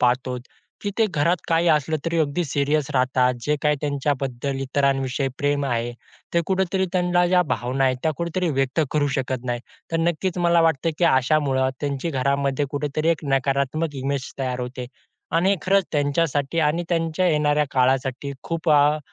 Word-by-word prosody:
पाहतो, 125 +1 +1 0.5
की 205 - -1
ते 220 - +4
घरात 170 0 +1
काही 165 +1 +3
असलं 150 +1 +1
तरी 165 0 0
अगदी 155 +3 0
सीरियस 145 +1 0
राहतात. 130 -1 +2
जे 150 0 +1
काही 150 0 +2
त्यांच्याबद्दल, 140 -2 -2
इतरांविषयी 135 0 0
प्रेम 145 0 0
आहे. 120 -1 -1 0.4
ते 170 - +4
कुठेतरी 190 0 0
त्यांना 180 -1 +2
ज्या 180 0 +4
भावना 130 +3 0
आहेत, 130 -1 +2
त्या 160 -1 +1
कुठेतरी 170 +1 -1
व्यक्त 135 +3 +1
करू 150 -1 +1
शकत 130 -2 -2
नाही. 120 -1 -2 0.3
तर 165 - +2
नक्कीच 180 +2 -2
मला 170 -1 +4
वाटतं, 165 -1 +2
की 175 - +2
अशामुळे 130 0 +2
त्यांची 140 +2 -2
घरामध्ये 140 +1 0
कुठेतरी, 150 +2 -1
एक 165 -2 0
नकारात्मक 140 +3 0
इमेज 140 -1 -2
तयार 125 -2 -2
होते 125 0 -5 0.5
आणि 190 +4 +3
खरंच 195 0 +3
त्यांच्यासाठी 145 +1 0
आणि 155 +3 +1
त्यांच्या 165 +1 0
येणाऱ्या 150 -2 +2
काळासाठी 130 +1 0
खूप 165 -1 -3
अ, 150 +1 +5
145 Hz, 160 wpm, -23 LUFS, 135-165 Hz, 0.5 s, अ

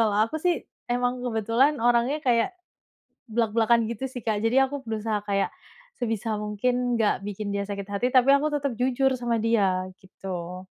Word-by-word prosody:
kalau 215 -3 +2
aku 230 - -5
sih, 355 -1 +3 0.4
emang 245 +1 0
kebetulan 235 +5 +2
orangnya 240 +5 +3
kayak 240 +4 +2 0.8
blak-blakan 230 0 +2
gitu 235 +4 -4
sih, 250 -2 -7
Kak. 215 -2 0
Jadi 230 +4 +2
aku 280 +1 -3
berusaha 215 -1 -2
kayak, 200 -1 +1 0.5
sebisa 225 -2 -1
mungkin 245 +3 0
nggak 210 -3 +2
bikin 205 0 -4
dia 200 0 -1
sakit 200 0 -4
hati, 205 +5 0
tapi 255 +1 +5
aku 300 +2 +1
tetep 280 -3 -1
jujur 260 +1 +2
sama 235 -1 0
dia, 195 -5 +1
gitu. 185 -1 -7
230 Hz, 165 wpm, -26 LUFS, 205-250 Hz, 0.8 s, tapi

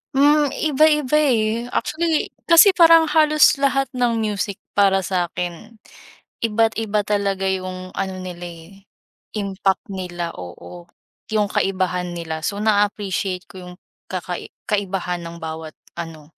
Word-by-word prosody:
Hmm, 290 +2 +5
iba-iba 300 -1 +3
eh, 235 -4 +1
actually, 320 +4 -1 0.2
kasi 335 +4 +8
parang 330 -3 +6
halos 305 -2 +5
lahat 275 -1 +1
ng 245 -3 0
music 205 -1 -2 0.2
para 195 -1 +3
sa'kin, 180 +3 -3 0.7
iba't 225 0 +1
iba 215 -2 0
talaga 200 -2 -1
'yung 185 -1 -4
ano 190 0 -3
nila 175 -1 -7
eh, 175 +4 -13 0.5
impact 195 -2 -1
nila 175 -3 -4
oo. 90 - -10 0.5
'Yung 210 -2 +1
kaibahan 180 -2 -1
nila, 160 -2 -5
so 205 +1 -3
na 210 -1 +4
appreciate 190 -2 -3
ko 190 - -11
'yung 180 -1 -10 0.3
kakai - - -5 0.2
kaibahan 195 -3 -1
ng 170 0 -8
bawat 160 -1 -6 0.2
ano 160 -2 -8
200 Hz, 130 wpm, -21 LUFS, 180-240 Hz, 0.7 s, kasi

